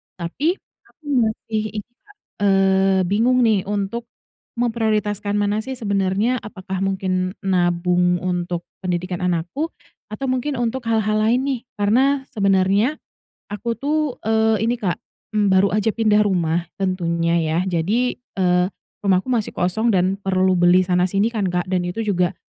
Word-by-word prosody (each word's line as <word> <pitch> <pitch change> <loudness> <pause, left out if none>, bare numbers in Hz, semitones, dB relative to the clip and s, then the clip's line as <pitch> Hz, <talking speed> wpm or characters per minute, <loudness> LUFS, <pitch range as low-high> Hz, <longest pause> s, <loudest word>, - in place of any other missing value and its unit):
Tapi 275 - -1 0.3
aku - - -30 0.2
masih 220 0 -3 0.2
itu, 245 - -55 0.2
Kak, 410 - -19 0.3
eee, 195 0 +3
bingung 230 +7 +2
nih, 215 -5 +2
untuk 205 +3 -3 0.5
memprioritaskan 215 -4 -1
mana 205 0 +1
sih 265 - -4
sebenernya, 200 0 0
apakah 190 -4 -6
mungkin 185 -1 -1
nabung 180 -1 +1
untuk 175 -1 -2 0.2
pendidikan 180 0 -2
anakku 180 - -2 0.4
atau 270 +4 -3
mungkin 255 +3 -1
untuk 240 +1 -2
hal-hal 215 -2 +1
lain 240 +3 +3
nih. 270 -2 -1
Karena 255 +7 +2
sebenernya 200 +5 +2 0.5
aku 230 +3 -4
tuh, 300 -1 -1
eee, 220 0 +2
ini, 240 - +2
Kak, 200 -7 -2 0.3
mmm, 210 -1 +1
baru 190 +1 +4
aja 210 +1 0
pindah 215 -2 +3
rumah 170 -3 0 0.2
tentunya 170 -2 0
ya. 160 0 0
Jadi, 190 +8 0
eee, 180 -6 +1 0.4
rumahku 190 +6 +2
masih 230 -4 -1
kosong 220 +6 +1
dan 185 +1 +1
perlu 185 -1 +1
beli 175 +1 +5
sana-sini 185 +4 +1
kan, 215 -4 -1
Kak, 180 0 -2
dan 180 -1 0
itu 180 +6 -3
juga 185 -3 0
200 Hz, 140 wpm, -21 LUFS, 180-225 Hz, 0.5 s, beli